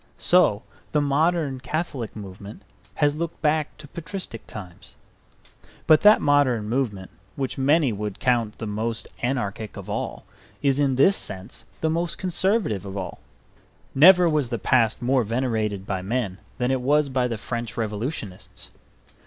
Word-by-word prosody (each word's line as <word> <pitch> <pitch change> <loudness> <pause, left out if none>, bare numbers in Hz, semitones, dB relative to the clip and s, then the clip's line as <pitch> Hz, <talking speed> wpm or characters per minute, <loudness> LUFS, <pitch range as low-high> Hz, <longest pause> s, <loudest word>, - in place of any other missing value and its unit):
So 125 - +3 0.3
the 150 - +4
modern 145 -1 +1
Catholic 135 -3 -4
movement 100 0 -9 0.3
has 145 -1 +2
looked 165 +1 -4
back 155 0 +1
to 150 - -12
patristic 165 - -7
times. 90 -5 -10 0.9
But 155 -1 +6
that 210 +1 +7
modern 130 -7 +3
movement 110 -6 -2 0.2
which 135 -1 -3
many 140 -1 +3
would 105 -1 -5
count 120 -4 +1
the 115 - -5
most 110 +2 -3
anarchic 110 -4 -2
of - - -7
all - - -4 0.4
is 140 0 +2
in 140 -2 +2
this 190 +10 +5
sense 95 - -9 0.2
the 160 - +1
most 170 +1 -1
conservative 185 - 0
of 100 0 -6
all. 95 - -5 0.7
Never 175 +5 +7
was 150 -6 +1
the 120 - -2
past 115 +1 +2
more 130 0 +3
venerated 110 -4 -1
by 95 -2 -2
men 100 -2 -2 0.2
than 125 0 0
it 130 -1 0
was 145 +3 +3
by 130 -2 0
the 115 -2 -3
French 115 0 -5
Revolutionists. 110 - -5
125 Hz, 150 wpm, -24 LUFS, 105-150 Hz, 0.9 s, that